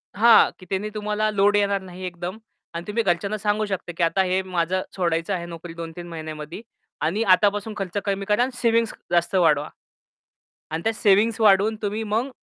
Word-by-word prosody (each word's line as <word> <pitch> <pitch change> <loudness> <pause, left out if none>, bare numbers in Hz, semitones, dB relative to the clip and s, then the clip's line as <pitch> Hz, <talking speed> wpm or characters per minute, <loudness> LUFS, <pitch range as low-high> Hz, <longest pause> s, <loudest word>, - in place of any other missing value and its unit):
हां, 230 +2 +6
की 185 - -13
त्यांनी 195 +2 -2
तुम्हाला 210 0 -1
लोड 205 0 +3
येणार 200 -1 +1
नाही 185 0 -10
एकदम 180 +3 -5 0.4
आणि 170 +1 -5
तुम्ही 225 +2 0
घरच्यांना 195 +3 0
सांगू 210 +1 0
शकता, 190 -3 -4
की 170 - +1
आता 180 +3 +2
हे 185 +1 +1
माझं 185 0 -1
सोडायचं 170 0 0
आहे 170 -2 -3
नोकरी 170 0 -9
2-3 170 +1 -8
महिन्यामध्ये 155 +1 -7 0.4
आणि 195 +8 0
आतापासून 205 +3 +3
खर्च 195 0 -4
कमी 195 -1 -1
करा 210 +3 +2
आणि 260 - -2
सेव्हिंग्ज 230 -1 +2 0.2
जास्त 175 +2 +1
वाढवा. 155 -4 +3 1.0
आणि 160 +1 -3
त्या 225 - +1
सेव्हिंग्ज 215 +2 +3
वाढवून, 210 +1 +4
तुम्ही 210 +2 -2
मग 225 +5 -1
195 Hz, 180 wpm, -23 LUFS, 175-210 Hz, 1.0 s, हां